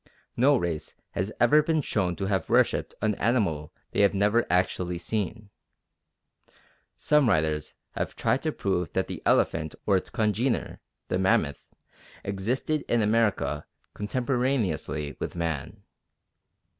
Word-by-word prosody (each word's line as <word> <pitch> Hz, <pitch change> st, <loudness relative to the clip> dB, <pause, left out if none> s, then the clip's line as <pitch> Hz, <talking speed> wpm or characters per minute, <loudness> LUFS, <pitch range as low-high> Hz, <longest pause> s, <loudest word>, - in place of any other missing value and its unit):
No 135 Hz, +4 st, +5 dB
race 85 Hz, -7 st, -3 dB, 0.2 s
has 95 Hz, +4 st, -2 dB
ever 120 Hz, +6 st, +6 dB
been 160 Hz, +1 st, +1 dB
shown 95 Hz, -10 st, 0 dB
to 95 Hz, -, -3 dB
have 95 Hz, -4 st, -1 dB
worshipped -, -, +2 dB
an 110 Hz, -1 st, +2 dB
animal 100 Hz, -11 st, +1 dB, 0.2 s
they -, -, +1 dB
have 100 Hz, 0 st, +4 dB
never 105 Hz, +4 st, +2 dB
actually 90 Hz, -1 st, +1 dB
seen. 105 Hz, +3 st, -3 dB, 1.5 s
Some 150 Hz, -5 st, +3 dB
writers 80 Hz, -5 st, 0 dB, 0.2 s
have -, -, -4 dB
tried -, -, +1 dB
to -, -, -1 dB
prove 90 Hz, -3 st, -1 dB
that -, -, +1 dB
the -, -, -7 dB
elephant 80 Hz, -1 st, +2 dB
or 100 Hz, -, +3 dB
its 95 Hz, -, -1 dB
congener, 115 Hz, +4 st, 0 dB, 0.3 s
the 90 Hz, -, 0 dB
mammoth, 80 Hz, -6 st, +1 dB, 0.6 s
existed 115 Hz, +10 st, -1 dB
in 120 Hz, -2 st, +2 dB
America 105 Hz, -8 st, +1 dB, 0.3 s
contemporaneously 120 Hz, -, -1 dB
with -, -, -4 dB
man. 85 Hz, +4 st, -3 dB
100 Hz, 130 wpm, -27 LUFS, 85-120 Hz, 1.5 s, ever